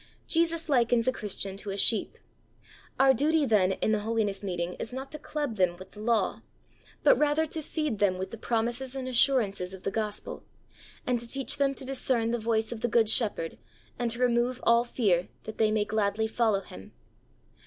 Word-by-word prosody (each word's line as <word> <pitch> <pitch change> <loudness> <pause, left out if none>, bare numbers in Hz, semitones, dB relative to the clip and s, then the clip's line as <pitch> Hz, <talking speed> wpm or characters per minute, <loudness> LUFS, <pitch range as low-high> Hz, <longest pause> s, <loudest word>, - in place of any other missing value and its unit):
Jesus 335 0 +1
likens 240 -4 +2
a - - +5
Christian 200 -4 -5
to 200 - -6
a 195 - -3
sheep. 220 +2 +2 0.8
Our 270 0 +6
duty 300 +4 +2
then 200 -6 +3
in 215 - -1
the 215 - +2
holiness 210 -2 -1
meeting 180 -3 -3
is 225 - -5
not 265 +2 -6
to 305 - -8
club 290 -6 -4
them 180 -2 +2
with 185 +1 -12
the 210 - -13
law, 215 -3 0 0.6
but - - +5
rather 300 +1 +2
to 315 +1 -4
feed 300 -7 -3
them 190 -3 +2
with 190 +1 -5
the 230 - -7
promises 240 +4 -1
and 260 -1 -4
assurances 220 -8 +2
of 185 - -14
the 195 - -1
Gospel, 210 0 -4 0.6
and 250 -1 +1
to 235 - -3
teach 270 +3 -1
them 275 -1 +1
to 265 - -7
discern 255 -3 0
the 240 - -1
voice 225 0 0
of 230 -2 -6
the - - +1
good 220 -1 +3
Shepherd 205 - 0 0.4
and 240 - 0
to 235 - -3
remove 245 0 +1
all 235 0 +4
fear, 200 -8 +1 0.2
that 220 - -8
they 220 -1 +4
may 215 -1 +1
gladly 215 0 0
follow 220 -3 +1
Him. 95 - -12
230 Hz, 195 wpm, -28 LUFS, 205-260 Hz, 0.8 s, Our